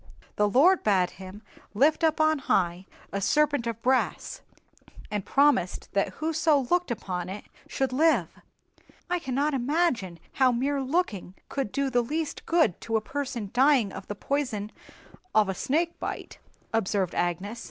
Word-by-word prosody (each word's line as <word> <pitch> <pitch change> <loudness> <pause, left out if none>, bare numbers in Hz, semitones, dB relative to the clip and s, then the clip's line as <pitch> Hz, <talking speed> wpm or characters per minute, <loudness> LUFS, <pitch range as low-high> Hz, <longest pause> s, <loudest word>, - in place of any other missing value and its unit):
The 210 0 +2
Lord 330 - +5
bade 190 -4 +2
him 190 +3 -11 0.3
lift 300 +9 +3
up 320 -1 +2
on 310 -1 +3
high 180 -7 0 0.3
a 200 - -2
serpent 290 0 +2
of 230 -1 -5
brass, 260 +1 0 0.7
and 205 -2 -2
promised 280 -10 +2
that 200 0 0
whoso 315 -1 +1
looked 355 -2 +2
upon 185 -6 -4
it 200 +2 -6 0.2
should 265 -2 -2
live." 265 - +2 0.7
"I 360 - +1
cannot 280 +1 -1
imagine 255 - 0
how 260 -2 +3
mere 275 +4 0
looking 260 - -2
could 270 -7 -3
do 275 -1 -1
the 245 -1 +3
least 305 +5 -4
good 325 - +2
to 225 -1 0
a - - +2
person 245 -5 -4
dying 255 -5 +4
of - - -9
the 205 - -5
poison 220 -5 -2 0.6
of 215 -2 +4
a - - 0
snake 330 - -1
bite," - - -6 0.3
observed 195 -4 0
Agnes. 185 +6 -2
250 Hz, 150 wpm, -27 LUFS, 200-295 Hz, 0.7 s, Lord